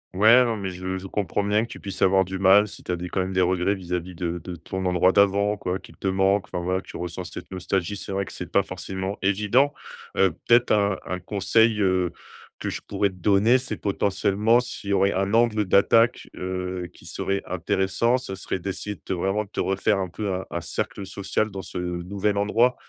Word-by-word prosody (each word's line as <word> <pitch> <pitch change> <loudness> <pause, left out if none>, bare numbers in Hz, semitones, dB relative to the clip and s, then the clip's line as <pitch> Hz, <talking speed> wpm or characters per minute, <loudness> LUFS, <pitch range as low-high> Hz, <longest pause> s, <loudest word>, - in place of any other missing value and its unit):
Ouais, 110 +6 +7
non. 115 -2 -1
Mais, 100 -2 -3
je 95 +1 -4
je 95 - -8
comprends 100 +1 -1
bien 105 +1 +2
que 115 - -5
tu - - -9
puisses 100 -3 -7
avoir 95 0 +4
du 95 +1 -5
mal 95 +2 +6
si - - -12
tu - - -4
as - - +1
des 90 +1 -6
quand 95 - -2
même 95 0 -1
des 95 - +2
regrets 90 +2 +2
vis-à-vis 90 -1 -4
de 85 0 -3
de 90 -1 -6
ton 95 +4 -5
endroit 90 +1 +4
d'avant 100 +1 +3
quoi, 90 -1 -3
qu'il - - -15
te - - -3
manque, 95 +1 +2
enfin, 90 - -3
voilà, 95 +2 0
tu - - -10
ressens 90 +1 -5
cette 90 - -9
nostalgie. 95 +1 -2
C'est 100 - -7
vrai 100 0 -1
que - - -10
c'est 90 -1 -7
pas 100 - +3
forcément 95 +1 -5
évident, 105 +8 +3 0.5
heu, 95 -3 +4 0.2
peut-être 120 +1 +5
un 100 -2 +3
un 90 - -3
conseil, 105 +4 +2
heu, 95 -3 +2 0.5
que - - -2
je - - -5
pourrais 100 - +1
te - - -13
donner, 100 +6 +4
c'est, 125 -5 -5
potentiellement, 100 +3 +2
s'il 120 -4 -6
y 100 - +2
aurait 100 0 +3
un 95 +2 -1
angle 115 -2 +3
d'attaque, 115 +5 +3
heu, 90 -1 -4
qui - - -18
serait 100 0 -2
intéressant, 95 +7 +1
ce 95 -6 -6
serait 95 - -4
d'essayer 100 +3 -4
de - - -35
te, - - -4
vraiment, 95 +4 0
de 100 - -22
te - - -2
refaire 95 +2 +1
un 95 - -2
peu 100 +2 -3
un 95 +1 -3
un 85 - -2
cercle 95 +4 -4
social 100 +2 -2
dans 95 0 -5
ce, 90 - -8
heu, 90 -1 -3
nouvel 100 +2 -1
endroit. 115 +5 +3
95 Hz, 230 wpm, -24 LUFS, 90-105 Hz, 0.5 s, Ouais